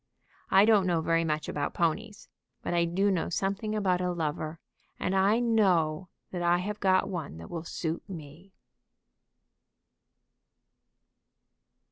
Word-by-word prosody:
I 195 +2 +6
don't 210 -4 +4
know 170 -2 +2
very 165 +1 +2
much 155 -1 -1
about 145 -1 -3
ponies, 205 +6 -1 0.4
but - - -2
I 170 0 +3
do 195 +4 +1
know 180 -4 0
something 200 +4 -2
about 185 -4 +1
a 180 0 0
lover, 155 -1 -3 0.4
and 185 - -1
I 200 +4 +4
know 185 -8 +2 0.2
that 180 - -4
I 175 0 +3
have 205 +4 -4
got 185 -1 +3
one 165 - -5
that 85 - -10
will 165 -2 -4
suit 165 +1 -4
me." 165 +2 -10
180 Hz, 135 wpm, -29 LUFS, 165-195 Hz, 0.4 s, I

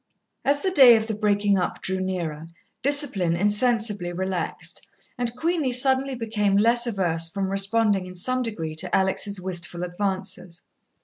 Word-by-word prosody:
As 285 +1 +1
the 380 - 0
day 265 -9 +7
of 220 - -3
the 220 - -4
breaking 205 -2 +1
up 180 - -3
drew 190 0 -3
nearer, 165 -4 -4 0.3
discipline 250 - +3
insensibly 210 -1 +1
relaxed, 185 -1 -3 0.3
and 245 -1 -3
Queenie 320 -1 -1
suddenly 265 +1 +3
became 215 -4 -1
less 235 +3 +2
averse 170 -6 0
from 195 +2 -3
responding 200 -1 +2
in 185 - -11
some 255 +8 -1
degree 180 -10 -5
to 180 +2 -2
Alex' 195 +1 -1
wistful 175 -1 -4
advances. 185 -1 -5
200 Hz, 145 wpm, -23 LUFS, 185-235 Hz, 0.3 s, day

